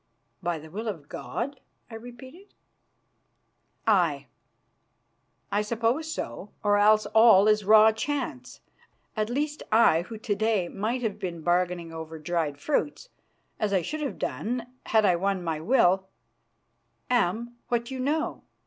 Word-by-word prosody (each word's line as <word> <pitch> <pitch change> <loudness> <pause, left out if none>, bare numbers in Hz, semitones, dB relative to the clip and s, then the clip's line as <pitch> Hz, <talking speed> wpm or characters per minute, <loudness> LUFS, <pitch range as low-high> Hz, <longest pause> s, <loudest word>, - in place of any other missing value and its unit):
"By 175 -2 -1
the 155 0 -12
will 220 +5 -5
of 165 -9 -5
God?" 265 - -5 0.3
I - - -10
repeated. 260 - -12 1.3
"Aye, 170 -10 +2 1.3
I 205 +1 +2
suppose 235 +9 -1
so, 175 - -5
or 205 -1 +3
else 215 +1 +5
all 220 -3 +7
is 215 -1 +3
raw 215 +1 +7
chance. 255 +1 -4 0.5
At 215 0 -1
least, 295 +4 -2
I, 215 -7 +5
who 220 +6 -8
to 215 -1 -2
day 205 -3 0
might 230 +5 -2
have 210 -2 -2
been 175 -4 -5
bargaining 175 -1 0
over 160 0 -7
dried 155 -2 -2
fruits, 295 - -2 0.5
as 210 -2 0
I 185 -3 +2
should 310 - -4
have 285 - -3
done 240 +1 -3 0.2
had 220 -2 +3
I 180 - +4
won 195 0 -1
my 165 -2 -2
will, 190 -1 +3 1.0
am 235 +1 0
what 235 +1 -1
you 260 - -5
know. 300 +5 -1
215 Hz, 140 wpm, -27 LUFS, 180-240 Hz, 1.3 s, all